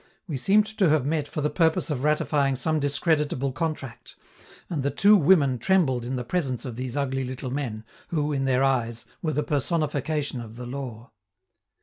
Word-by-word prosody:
We 155 Hz, -, -3 dB
seemed 200 Hz, +10 st, +3 dB
to 190 Hz, -5 st, +5 dB
have 150 Hz, -3 st, +2 dB
met 150 Hz, 0 st, 0 dB
for 150 Hz, -, -4 dB
the 150 Hz, 0 st, 0 dB
purpose 165 Hz, +1 st, +1 dB
of 135 Hz, -3 st, -2 dB
ratifying 145 Hz, -2 st, +2 dB
some 155 Hz, +4 st, 0 dB
discreditable 145 Hz, -2 st, +1 dB
contract, 145 Hz, -5 st, -5 dB, 0.5 s
and 160 Hz, -5 st, -2 dB
the 140 Hz, -, 0 dB
two 205 Hz, +7 st, +5 dB
women 145 Hz, -, +4 dB
trembled 135 Hz, -6 st, +2 dB
in 130 Hz, +2 st, -3 dB
the 125 Hz, -, -3 dB
presence 135 Hz, -3 st, -2 dB
of 125 Hz, -3 st, -5 dB
these 125 Hz, +2 st, -4 dB
ugly 135 Hz, -1 st, -1 dB
little 130 Hz, 0 st, -5 dB
men, 125 Hz, -6 st, -3 dB, 0.2 s
who, 150 Hz, -3 st, -1 dB
in 135 Hz, -1 st, 0 dB
their 130 Hz, 0 st, +2 dB
eyes, 120 Hz, -4 st, 0 dB, 0.2 s
were 155 Hz, -2 st, -1 dB
the 150 Hz, +2 st, 0 dB
personification 150 Hz, -2 st, -1 dB
of 115 Hz, -1 st, -10 dB
the 125 Hz, +1 st, -7 dB
law. 125 Hz, -2 st, -7 dB
140 Hz, 185 wpm, -25 LUFS, 130-155 Hz, 0.5 s, to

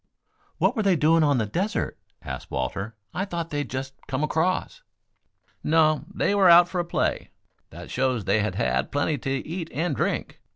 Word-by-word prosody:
"What -, -, +2 dB
were 220 Hz, -, +1 dB
they 195 Hz, -3 st, +3 dB
doing 165 Hz, +1 st, +4 dB
on 145 Hz, -3 st, +3 dB
the 110 Hz, -, +1 dB
desert?" 190 Hz, -, -2 dB, 0.3 s
asked 65 Hz, -1 st, -6 dB
Walter. 95 Hz, -, -3 dB, 0.2 s
"I 185 Hz, -, -1 dB
thought 170 Hz, -4 st, -4 dB
they 145 Hz, -, -1 dB
had 145 Hz, -, -3 dB
just 135 Hz, +1 st, -4 dB
come 135 Hz, +1 st, -2 dB
across." 180 Hz, -, 0 dB, 0.8 s
"No; 155 Hz, -1 st, +3 dB
they 200 Hz, -, 0 dB
were 195 Hz, -3 st, +5 dB
out 170 Hz, +1 st, +8 dB
for 180 Hz, -, -3 dB
a 175 Hz, -, 0 dB
play. 170 Hz, -, -1 dB, 0.4 s
That -, -, -10 dB
shows 130 Hz, -5 st, 0 dB
they 100 Hz, +3 st, +2 dB
had 105 Hz, -3 st, -1 dB
had 65 Hz, -3 st, 0 dB
plenty 145 Hz, +1 st, 0 dB
to 135 Hz, -1 st, -3 dB
eat 165 Hz, 0 st, -4 dB
and 165 Hz, +6 st, -1 dB
drink. -, -, -2 dB
155 Hz, 190 wpm, -25 LUFS, 125-175 Hz, 0.8 s, out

